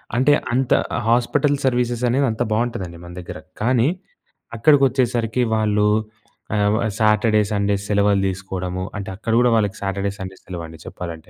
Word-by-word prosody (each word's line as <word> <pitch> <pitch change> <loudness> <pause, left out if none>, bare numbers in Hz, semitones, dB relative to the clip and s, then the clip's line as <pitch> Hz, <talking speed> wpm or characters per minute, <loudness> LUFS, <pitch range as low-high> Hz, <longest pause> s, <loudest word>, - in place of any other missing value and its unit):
అంటే 135 +4 +4 0.2
అంత 130 0 0 0.4
hospital 135 +5 +2
services 120 -1 0
అనేవి 135 +3 +2
అంత 110 - -6
బావుంటదండి 110 -6 -2
మన 85 - -10
దగ్గర. 85 - -8 0.2
కానీ 125 +2 +3 0.7
అక్కడికొచ్చేసరికి 125 -3 +2
వాళ్ళు 105 -1 +2 0.7
ఆ - - +1 0.2
వ - - +2 0.2
సాటర్‌డే 110 0 +3
సండేస్ 100 -1 0
సెలవులు 100 -1 +3
తీసుకోవడము. 95 -1 -4
అంటే 100 - -5
అక్కడ 115 +3 -3
కూడా 125 0 +4
వాళ్ళకి 105 -1 +1
సాటర్‌డే 100 0 -2
సండే 95 0 -7
సెలవండి 85 -3 -8
చెప్పాలంటే. 85 -2 -8
110 Hz, 140 wpm, -21 LUFS, 95-120 Hz, 0.7 s, అంటే